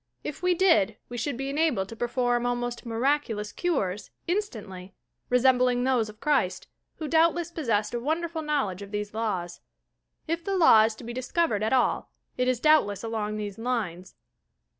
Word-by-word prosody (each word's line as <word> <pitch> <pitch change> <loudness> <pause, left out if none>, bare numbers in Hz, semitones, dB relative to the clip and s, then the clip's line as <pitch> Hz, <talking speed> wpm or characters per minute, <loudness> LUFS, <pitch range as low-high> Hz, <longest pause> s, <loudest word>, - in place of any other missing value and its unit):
If 300 - -6
we 360 0 +2
did, 225 - +3
we 245 - -6
should 245 +2 -2
be 270 +1 -3
enabled 285 -10 +1
to 230 - -8
perform 240 0 0
almost 245 0 -3
"miraculous 230 -3 0
cures," 210 - -2 0.2
instantly, 210 - -4 0.3
resembling 250 0 +3
those 250 -4 +1
of 215 0 -13
Christ, 270 -11 +1 0.3
who 310 - -5
doubtless 330 +2 +2
possessed 225 -10 -1
a 240 - -1
wonderful 320 +5 -2
knowl 295 -9 0
edge 185 +2 -9
of 200 - -8
these 205 0 -4
laws. 190 -6 -3 0.7
If 335 +1 -2
the 390 +2 -1
law 225 -11 +7
is 220 0 -2
to 245 - -12
be 235 +1 -6
discovered 255 -1 0
at 220 - 0
all 260 -2 +1 0.2
it 250 0 0
is 255 -2 +1
doubtless 280 -10 +3
along 215 -2 -2
these 205 -1 -5
lines. 205 -7 -3
245 Hz, 170 wpm, -27 LUFS, 210-300 Hz, 0.7 s, law